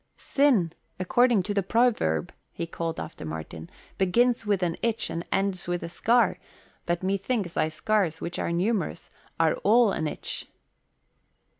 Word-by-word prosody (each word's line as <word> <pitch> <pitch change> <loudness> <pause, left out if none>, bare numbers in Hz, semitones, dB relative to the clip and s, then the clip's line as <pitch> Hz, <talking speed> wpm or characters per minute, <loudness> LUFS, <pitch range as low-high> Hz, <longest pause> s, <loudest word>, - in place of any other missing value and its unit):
"'Sin,' 245 - +2 0.3
according 235 +2 +3
to 205 - -2
the 200 - +2
proverb," 195 - +1 0.2
he 170 - -4
called 165 0 -4
after 155 - -7
Martin, 80 +1 -7 0.3
"'begins 230 +4 +2
with 200 -3 +1
an 170 -2 0
itch 230 -1 -1
and 170 - -3
ends 195 -2 0
with 175 0 -2
a - - -5
scar,' 235 +7 +2 0.5
but 175 +1 0
methinks 195 0 -1
thy - - +1
scars, 175 -1 0
which 170 - -5
are - - -1
numerous, 185 +1 -1 0.3
are 165 -1 +4
all 225 +1 +4
an 160 -4 -1
itch." - - -6
185 Hz, 150 wpm, -27 LUFS, 165-225 Hz, 0.5 s, are